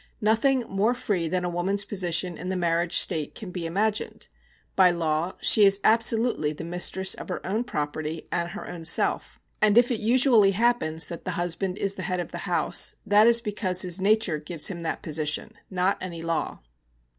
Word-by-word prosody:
Nothing 230 +5 +2
more 210 +5 0
free 185 -8 -2
than 180 +2 -2
a - - -2
woman's 190 +4 -2
position 180 -3 0
in 180 +3 -7
the 190 - -2
marriage 170 -1 +1
state 155 -2 0
can 195 -4 -8
be 175 -2 -4
imagined. 210 +5 -2 0.5
By 185 -2 +5
law 165 0 -1
she 215 - +6
is 195 0 +5
absolutely 225 -7 +2
the 155 - -9
mistress 180 +2 -1
of - - -10
her 180 - -3
own 215 +6 -1
property 155 -3 -5
and 170 0 -1
her 205 +4 -8
own 170 -2 -8
self; 165 - 0 0.2
and 215 0 +4
if 245 +1 +4
it 230 - -1
usually 230 -3 +4
happens 200 -7 0
that 170 - -8
the - - -5
husband 175 +2 -2
is 200 -1 0
the 195 - -7
head 180 0 -1
of 175 - -5
the - - -6
house, - - +1
that 210 +2 +5
is 235 0 +5
because 205 -5 0
his 180 +1 -1
nature 200 -5 +1
gives 155 +1 -1
him 180 -3 -6
that 165 -1 -4
position, 150 -1 -1 0.2
not 185 +1 0
any 170 -3 -7
law. 165 -1 -3
185 Hz, 190 wpm, -25 LUFS, 170-210 Hz, 0.5 s, she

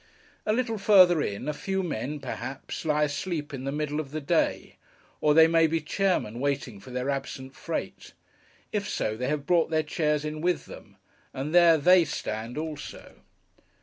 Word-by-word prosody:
A - - +3
little 225 -1 -1
further 185 -5 +6
in, 100 0 -3
a 150 - 0
few 190 +5 -2
men, 150 -2 -3
perhaps, 130 +5 -6
lie 150 -1 +2
asleep 150 0 -3
in 135 -1 -5
the 135 - -1
middle 150 0 -2
of 150 -3 -4
the 155 +2 -4
day; 140 - 0 0.4
or 150 -1 +3
they 160 0 +8
may 165 0 +4
be 165 +1 0
chairmen 155 - -1
waiting 135 -6 -2
for 130 - -13
their 125 +2 -2
absent 135 -1 -5
freight. - - -5 0.6
If 205 -2 -2
so, 110 - -1
they 125 +3 -3
have 145 0 -2
brought 170 +1 +3
their 155 -1 +1
chairs 150 -1 0
in 155 0 -4
with 180 0 0
them, - - -13 0.4
and 140 +4 -4
there 170 -2 +7
they 180 +4 +6
stand 115 -3 -5
also. 155 -1 -7
150 Hz, 180 wpm, -27 LUFS, 135-170 Hz, 0.6 s, they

